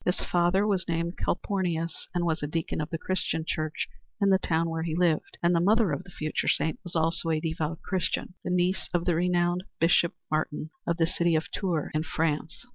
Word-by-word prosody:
His 180 - +1
father 175 +3 +2
was 195 -4 +1
named 170 +1 -1
Calpornius 175 -4 -1
and 175 -1 +1
was 165 -1 0
a 145 - -1
deacon 160 +1 -2
of 150 - -3
the 165 - -2
Christian 165 -2 -1
church 155 -1 -2 0.3
in 200 -2 +4
the 190 - +5
town 165 -2 +1
where 165 0 -2
he 160 -1 -2
lived, 170 -3 +1
and 170 +1 +4
the 170 - +4
mother 205 +1 +4
of 145 +5 -2
the - - -12
future 155 -3 -2
saint 160 - +1
was 175 - -7
also 165 +1 +1
a 160 -1 +2
devout 160 0 -3
Christian, 185 -1 -1
the - - -3
niece 180 +1 +1
of 175 - +1
the 175 - +3
renowned 175 +1 +2 0.2
Bishop 170 +1 +4 0.2
Martin 155 0 -1 0.2
of 170 - +1
the 165 - +4
city 170 -1 +1
of 155 - -1
Tours 175 -7 -1
in 155 - +1
France. 160 +2 -2
170 Hz, 210 wpm, -28 LUFS, 160-180 Hz, 0.3 s, the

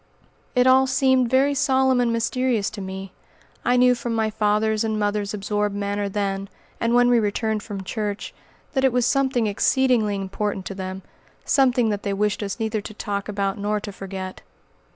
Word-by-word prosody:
It 250 0 +4
all 260 +1 +5
seemed 260 -2 +3
very 270 +3 +3
solemn 265 -2 +2
and 240 -1 +1
mysterious 230 -1 0
to 205 - -7
me. 190 0 -6 0.5
I 245 +1 +3
knew 250 0 +5
from 235 -1 -3
my 220 -1 0
father's 215 0 +1
and 220 -1 -1
mother's 205 0 -1
absorbed 205 0 -1
manner 200 0 -2
then, 195 -1 -2 0.3
and 230 +1 +1
when 245 0 +5
we 245 -1 +4
returned 215 0 -1
from 200 -2 -6
church, 205 +1 -4 0.4
that 265 -2 +1
it 265 -2 +3
was 250 -1 +2
something 265 -3 +2
exceedingly 220 0 +2
important 195 0 -3
to 195 - -5
Them 190 0 -6 0.4
something 250 -4 +3
that 205 -1 -2
they 200 - -2
wished 210 +2 0
us 200 +2 -4
neither 220 -1 -1
to 215 +1 -9
talk 200 -1 -4
about 200 -1 -2
nor 210 +1 0
to 205 0 -7
forget. 190 -1 -7
215 Hz, 180 wpm, -23 LUFS, 200-245 Hz, 0.5 s, all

